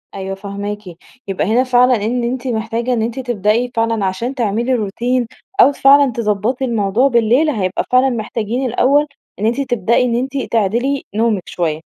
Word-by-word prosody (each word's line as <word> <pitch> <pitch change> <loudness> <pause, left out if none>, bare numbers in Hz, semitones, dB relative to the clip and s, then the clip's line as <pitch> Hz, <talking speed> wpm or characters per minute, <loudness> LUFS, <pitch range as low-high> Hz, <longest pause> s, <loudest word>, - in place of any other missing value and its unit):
أيوه 195 0 -4
فاهماكِ. 200 +1 -5 0.5
يبقى 195 -1 -1
هنا 235 +4 +3
فعلًا 250 0 +4
إن 240 +1 -1
أنتِ 250 +2 -3
محتاجة 230 +1 -2
إن 230 - 0
أنتِ 235 +3 -3
تبدئي 240 0 0
فعلًا 225 -3 0
عشان 230 +8 -3
تعملي 235 +2 0
روتين 240 +3 -1 0.3
أو 285 - +6
فعلًا 275 -1 +5
تضبَّطي 225 +3 -1
الموضوع 225 +1 +1
بالليل، 245 +5 +3
هيبقى 190 -8 -1
فعلًا 255 +1 +4
محتاجين 230 +1 -3
الأول، 270 +4 +2 0.3
إن 210 - -1
أنتِ 240 +5 +1
تبدئي 240 -2 +1
إن 235 - 0
أنتِ 265 +3 -2
تعدِلي 235 +6 0
نومِك 215 -4 +1
شويّة. 160 -3 -2
235 Hz, 160 wpm, -17 LUFS, 210-255 Hz, 0.5 s, أو